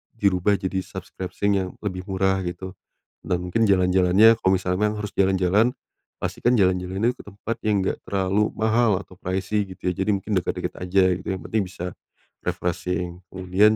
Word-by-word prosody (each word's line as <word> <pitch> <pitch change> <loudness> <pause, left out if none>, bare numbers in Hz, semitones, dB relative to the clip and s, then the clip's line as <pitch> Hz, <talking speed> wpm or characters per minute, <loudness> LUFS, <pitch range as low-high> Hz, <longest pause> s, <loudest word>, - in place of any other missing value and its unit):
dirubah 100 -2 +2
jadi 95 0 -1
subscription 95 +2 -3
yang 95 -1 -1
lebih 95 -3 -3
murah 95 0 +2
gitu, 90 +2 -5 0.5
dan 90 - 0
mungkin 115 +6 +2
jalan-jalannya, 95 +3 +5
kalo 95 - +2
misalnya 90 0 -1
emang 105 0 -2
harus 105 - -5
jalan-jalan, 95 +4 +3 0.5
pastikan 120 +1 +1
jalan-jalan 90 0 +1
ini 115 - +4
ke - - -11
tempat 105 +3 -5
yang 105 -2 +2
nggak - - -1
terlalu 100 +2 +1
mahal 110 -2 +2
atau 95 - -15
pricy 95 +3 -1
gitu 95 -1 -3
ya - - -3
jadi 95 +3 +1
mungkin 100 +2 -2
deket-deket - - -3
aja 90 +2 +2 0.2
gitu - - -11
yang - - -7
penting 110 -2 +1
bisa, 90 -1 -6 0.5
refreshing 90 0 -2
kemudian 95 +3 +3
95 Hz, 165 wpm, -24 LUFS, 90-105 Hz, 0.5 s, jalan-jalannya